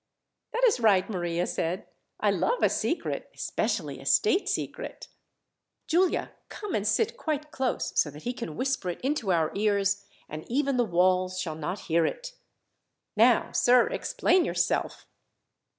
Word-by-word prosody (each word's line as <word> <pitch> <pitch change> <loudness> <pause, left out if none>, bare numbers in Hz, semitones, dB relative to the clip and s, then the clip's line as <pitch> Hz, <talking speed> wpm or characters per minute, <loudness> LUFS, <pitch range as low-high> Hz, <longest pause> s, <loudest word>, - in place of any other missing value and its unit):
"That 480 - -2
is 440 - +3
right," 200 -5 +4
Maria 175 -3 -1
said. 175 +3 -2 0.3
"I - - +2
love 485 - 0
a - - +5
secret, - - -2
especially - - -2
a - - -12
state 415 -2 +3
secret. - - -4 0.8
"Giulia, 360 +3 +1 0.2
come 415 -4 -6
and 210 0 0
sit 450 - +1
quite 305 - -3
close, 265 -4 -2
so 150 - +3
that 150 +2 -12
he 245 - -2
can 235 -11 -6
whisper 260 - -1
it 175 - -5
into 260 -7 0
our 160 -3 +2
ears, 200 -1 +1 0.2
and 155 +1 -7
even 275 +1 +1
the 245 - +4
walls 185 0 +2
shall 165 -4 -3
not 160 +5 -4
hear 170 -1 +1
it. - - -3 0.8
"Now, - - +4
sir, 245 0 +4
explain 370 -1 +1
yourself!" - - -1
215 Hz, 150 wpm, -27 LUFS, 180-300 Hz, 0.8 s, a